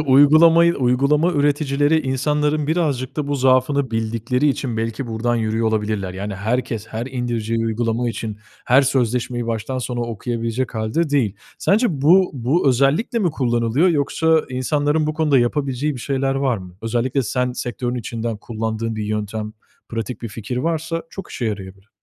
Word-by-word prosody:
uygulamayı, 155 +5 +6
uygulama 140 +7 +2
üreticileri 145 0 +2
insanların 150 +2 0
birazcık 145 -6 -1
da 145 -2 -2
bu 145 - 0
zaafını 130 +1 +2
bildikleri 115 +5 0
için 130 -4 -2
belki 115 +3 -3
buradan 120 +1 -1
yürüyor 110 0 0
olabilirler. 105 -4 -2
Yani 100 +2 -4
herkes, 110 +2 -2
her 115 +3 -5
indireceği 120 -3 -2
uygulama 115 +1 0
için 110 -2 -5 0.3
her 135 +3 +5
sözleşmeyi 125 -2 0
baştan 115 +3 -3
sona 125 -1 -3
okuyabilecek 115 +1 -3
hâlde 110 +9 -1
değil. 120 -9 +1 0.2
Sence 220 +5 +3 0.2
bu 180 +5 +5
bu 135 +5 +1
özellikle 140 - +2
mi 180 -6 +1
kullanılıyor 120 +3 +1
yoksa 160 +1 +2
insanların 145 +4 0
bu 155 - -2
konuda 150 -4 +3
yapabileceği 135 +3 0
bir 125 - -7
şeyler 135 +1 -1
var 135 -3 +1
mı? 90 -1 -12
Özellikle 120 +4 0
sen 125 +2 -1
sektörün 120 0 -3
içinden 115 -1 -3
kullandığın 110 +1 -3
bir 105 - -3
yöntem, 105 0 -3 0.4
pratik 115 0 -5
bir 115 - -3
fikir 115 +3 -6
varsa 165 +3 -1
çok 195 - -8
işe 125 - -4
yarayabilir. 100 -2 -5
125 Hz, 155 wpm, -20 LUFS, 115-145 Hz, 0.4 s, uygulamayı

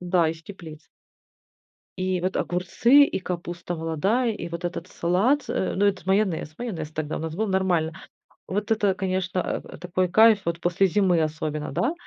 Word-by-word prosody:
Да, 175 -2 +2
из 165 0 -5
теплиц. 160 -5 -11 1.1
И 185 -1 -1
вот 185 +2 -1
огурцы, 230 +10 +4
и - - -2
капуста 175 -1 -5
молодая, 190 +10 0
и 175 -5 -6
вот 170 +1 -3
этот 175 0 -5
салат 195 +12 +1
с - - -17
э, - - -1
ну, 200 +2 +2
это 195 -2 0
майонез, 190 -5 +1
майонез 175 -11 -4
тогда 155 -1 -3
у - - -3
нас 160 0 -4
был, 215 +5 -1
нормально. 180 -4 +1 0.5
Вот 205 +3 -3
это, 205 -3 +2
конечно, 185 -1 -1
э, - - -2
э, - - -7
такой 180 +1 -1
кайф 220 +3 +6
вот 170 0 -1
после 175 +3 +2
зимы 185 -2 +2
особенно, 155 -1 -2
да? 230 - 0
180 Hz, 180 wpm, -25 LUFS, 170-200 Hz, 1.1 s, кайф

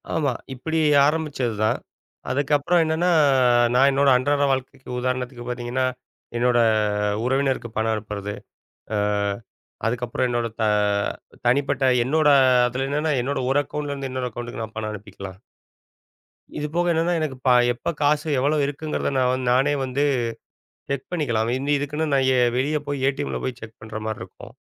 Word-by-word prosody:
ஆமா. 140 -5 +1 0.2
இப்படி 160 +5 -2 0.3
ஆரம்பிச்சதுதான். 130 -9 0 0.5
அதுக்கப்புறம் 145 +5 +2
என்னன்னா, 160 +3 +1 0.6
நான் 135 +3 +5
என்னோட 140 +1 +3
அன்றாட 145 +3 +1
வாழ்க்கைக்கு 130 0 -4
உதாரணத்துக்குப் 125 -1 -3
பாத்தீங்கன்னா, 125 +1 -2 0.5
என்னோட 120 0 +3 0.7
உறவினருக்கு 135 -2 0
பணம் 110 0 +1
அனுப்புறது. 105 -1 -5 0.6
அ - - +1 0.9
அதுக்கப்புறம் 120 +2 -1
என்னோட 120 -1 0
த - - +2 0.8
தனிப்பட்ட, 135 +2 +2 0.2
என்னோட 150 +4 +2 0.4
அதுல 130 +2 -2
என்னன்னா 150 +2 0
என்னோட 140 +3 -2
ஒரு 135 - +3
அக்கவுண்ட்ல 145 0 -5
இருந்து 135 -1 -5
இன்னொரு 130 -1 -3
அக்கவுண்ட்க்கு 120 0 -6
நான் 110 0 -12
பணம் 110 -1 -3
அனுப்பிக்கலாம். 100 -2 -9 1.2
இது 150 - -2
போக 175 +1 +1
என்னன்னா, 165 +1 +1
எனக்கு 150 -5 -3
பா 125 - +6 0.2
எப்ப 120 - -3
காசு 150 +2 +2
எவ்வளோ 145 +4 +1
இருக்குங்கிறத 145 +2 -3
நான் 130 0 +1
நானே 135 +4 +3
வந்து 130 +2 -1 0.9
செக் 140 -2 -3
பண்ணிக்கலாம். 120 -10 0 0.3
இதுக்குன்னு 150 +2 -2
நான் 135 -1 +3
எ - - +4 0.2
வெளிய 150 +4 +1
போய் 140 -2 -3
ஏடிஎம்ல 140 +1 -3
போய் 130 -2 -4
செக் 110 0 -11
பண்ற 110 -1 -6
மாரி 110 -1 -3
இருக்கும். 95 - -13
130 Hz, 140 wpm, -23 LUFS, 120-145 Hz, 1.2 s, பா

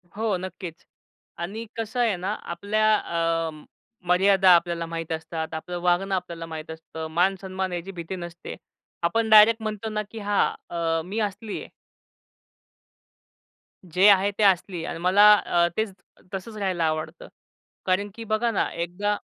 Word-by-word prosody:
हो, 215 -1 0
नक्कीच 180 -2 -8 0.5
आणि 205 +7 -5
कसं 225 +2 -3
आहे 225 -5 +2
ना 185 +4 -3 0.2
आपल्या 215 +5 +2
अ, 165 -2 -1 0.6
मर्यादा 190 +1 +5
आपल्याला 170 -1 +1
माहीत 165 0 -5
असतात. 160 0 -4
आपलं 175 +3 -5
वागणं 180 +2 +2
आपल्याला 170 -3 -4
माहीत 160 -1 -7
असतं. 160 0 -7
मान-सन्मान 185 +2 0
याची 175 +2 -4
भीती 175 +1 -6
नसते. 175 -1 -8 0.5
आपण 220 +7 +1
डायरेक्ट 220 +1 +7
म्हणतो 215 0 -4
ना, 215 0 -1
की 225 - -8
हां, 205 -1 +2 0.3
अ, 165 -1 0
मी 195 +5 -5
असली 210 0 -3
आहे. - - -10 2.2
जे 185 +4 +5
आहे 200 0 +5
ते 215 - +2
असली 185 -3 +2
आणि 165 - -5
मला 200 +4 +7
अ, 170 0 +3
तेच 220 -3 -1 0.4
तसंच 195 +3 -6
राहायला 185 -5 0
आवडतं 155 - -3 0.6
कारण 190 +2 +1
की 230 - -7
बघा 220 +2 0
ना 210 - 0
एकदा 180 +5 -2
185 Hz, 145 wpm, -25 LUFS, 170-210 Hz, 2.2 s, डायरेक्ट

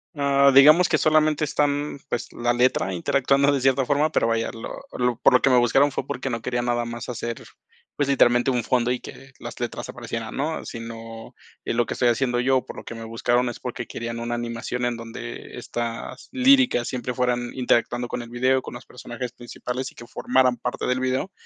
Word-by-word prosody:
Ah, 140 -1 +4
digamos 155 +6 +7
que 155 - +3
solamente 155 0 +3
están, 145 -1 0
pues, 120 - -3
la 120 0 0
letra 120 -6 +1
interactuando 140 +9 +2
de 140 -2 0
cierta 135 0 +2
forma, 145 +3 +2
pero 115 - +2
vaya, 115 0 0
lo 115 - -8 0.3
lo 125 -1 +1
por - - +4
lo 125 - +5
que 135 - +3
me 125 - +5
buscaron 135 +4 +4
fue 135 - -4
porque 130 +2 -3
no 115 -2 -3
quería 120 -1 -1
nada 120 -1 0
más 120 +1 -6
hacer, 115 -1 -5 0.5
pues, 145 -2 0
literalmente 120 -1 +4
un 120 -3 0
fondo 125 -1 +1
y 125 - -1
que 135 0 -12
las 120 - -8
letras 120 -1 -4
aparecieran, 115 -2 -6
¿no? 155 +4 -2
Sino 115 -1 -8 0.3
y - - -2
lo 120 0 +2
que - - -4
estoy 125 - +1
haciendo 120 0 +1
yo, 130 0 +2
por - - -10
lo - - -8
que 115 - -8
me 115 - -8
buscaron, 120 +2 0
es - - -7
porque 120 -1 -5
querían 115 0 -5
una 120 0 -3
animación 120 +1 -3
en 120 -1 -1
donde 115 0 -8
estas 115 -1 -5
líricas 260 - +4
siempre 125 -1 -3
fueran 120 -1 -1
interactuando 120 -1 +1
con 120 - -4
el 115 - -10
video, 130 +2 +1
con - - -9
los 120 - -10
personajes 125 0 -7
principales, 125 +1 -6
y - - -25
que 120 - -11
formaran 125 -1 +1
parte 125 +1 -3
del 125 0 +1
video, 130 +8 -1
125 Hz, 210 wpm, -24 LUFS, 120-135 Hz, 0.5 s, digamos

